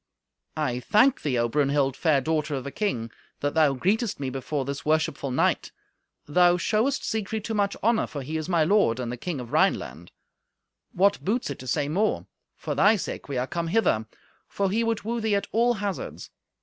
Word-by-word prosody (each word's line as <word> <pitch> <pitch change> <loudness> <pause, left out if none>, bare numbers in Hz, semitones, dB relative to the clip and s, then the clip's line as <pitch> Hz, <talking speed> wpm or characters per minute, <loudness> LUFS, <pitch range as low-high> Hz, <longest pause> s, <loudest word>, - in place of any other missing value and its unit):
"I 130 -5 -1
thank 245 - +3
thee, 135 -5 0
O 120 0 +2
Brunhild, 140 +1 +1
fair 150 -4 +2
daughter 155 +1 -1
of 130 - -5
a 140 - -5
king, 125 - -2 0.3
that 145 0 0
thou 155 -3 +4
greetest 205 - 0
me 135 -2 -3
before 135 +1 -3
this 140 +1 -4
worshipful 155 -2 0
knight. 130 - +1 0.5
Thou 175 +3 +4
showest 220 +9 0
Siegfried 220 -1 -2
too 225 - -3
much 200 -2 0
honour, 225 +1 +2
for 140 -3 -6
he 155 +5 -5
is 160 +2 -3
my 170 -3 +3
lord, 165 - +3
and 120 -2 -3
the - - -3
king 155 +4 -4
of 120 -2 -7
the - - -13
Rhineland. - - 0 0.8
What 200 +3 +2
boots 220 - -1
it 140 - -7
to 130 - -9
say 145 +3 0
more? 195 +9 0 0.3
For - - -4
thy 210 +2 +5
sake 185 - -5
we 135 - -2
are 125 - 0
come 170 +4 -3
hither, 165 - +1 0.4
for 195 -1 -1
he 225 +3 +1
would 230 -1 -1
woo 230 +2 -2
thee 220 -2 +1
at 200 - 0
all 240 +2 +3
hazards. 200 -3 -5
160 Hz, 200 wpm, -26 LUFS, 140-210 Hz, 0.8 s, thy